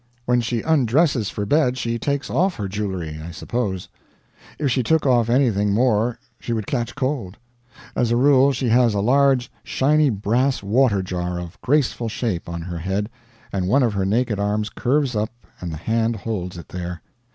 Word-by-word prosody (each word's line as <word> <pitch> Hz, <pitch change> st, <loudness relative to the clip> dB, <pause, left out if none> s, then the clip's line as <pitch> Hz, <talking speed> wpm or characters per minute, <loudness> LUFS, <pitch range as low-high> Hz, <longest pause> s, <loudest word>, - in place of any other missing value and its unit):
When 125 Hz, 0 st, +2 dB
she 115 Hz, 0 st, -2 dB
undresses 140 Hz, -, +2 dB
for 105 Hz, -, -3 dB
bed 130 Hz, 0 st, +2 dB
she 115 Hz, -2 st, -2 dB
takes 140 Hz, +2 st, -1 dB
off 185 Hz, +1 st, +2 dB
her 100 Hz, -, -3 dB
jewelry, 95 Hz, -6 st, -4 dB
I 85 Hz, -, -7 dB
suppose. 95 Hz, +2 st, -3 dB, 0.7 s
If 145 Hz, -3 st, 0 dB
she 130 Hz, -, +2 dB
took 160 Hz, +5 st, +1 dB
off 120 Hz, -4 st, +3 dB
anything 110 Hz, -6 st, +2 dB
more 120 Hz, 0 st, +2 dB, 0.2 s
she 120 Hz, -, -3 dB
would 110 Hz, -3 st, -2 dB
catch 120 Hz, -1 st, -2 dB
cold. 130 Hz, -8 st, -2 dB, 0.6 s
As 120 Hz, -, +1 dB
a 120 Hz, -, +2 dB
rule 135 Hz, +1 st, +5 dB
she 130 Hz, -1 st, -1 dB
has 120 Hz, -2 st, +4 dB
a -, -, +1 dB
large 130 Hz, +3 st, +3 dB
shiney 150 Hz, +2 st, +2 dB
brass 120 Hz, +4 st, 0 dB
water 105 Hz, -1 st, +2 dB
jar 90 Hz, -1 st, -3 dB
of 85 Hz, -1 st, -9 dB
graceful 130 Hz, -4 st, +1 dB
shape 105 Hz, -7 st, -3 dB
on 85 Hz, -1 st, -5 dB
her 85 Hz, -1 st, -5 dB
head, 95 Hz, +5 st, -2 dB, 0.4 s
and 95 Hz, -2 st, -1 dB
one 130 Hz, +7 st, +4 dB
of 115 Hz, -4 st, +1 dB
her 100 Hz, -1 st, 0 dB
naked 110 Hz, 0 st, 0 dB
arms 105 Hz, +1 st, -1 dB
curves 135 Hz, -1 st, 0 dB
up 105 Hz, +1 st, 0 dB, 0.3 s
and 90 Hz, -2 st, -5 dB
the 80 Hz, -, -5 dB
hand 115 Hz, +6 st, 0 dB
holds 95 Hz, -5 st, -4 dB
it 85 Hz, -, -10 dB
there. 90 Hz, -2 st, -6 dB
115 Hz, 185 wpm, -22 LUFS, 100-130 Hz, 0.7 s, rule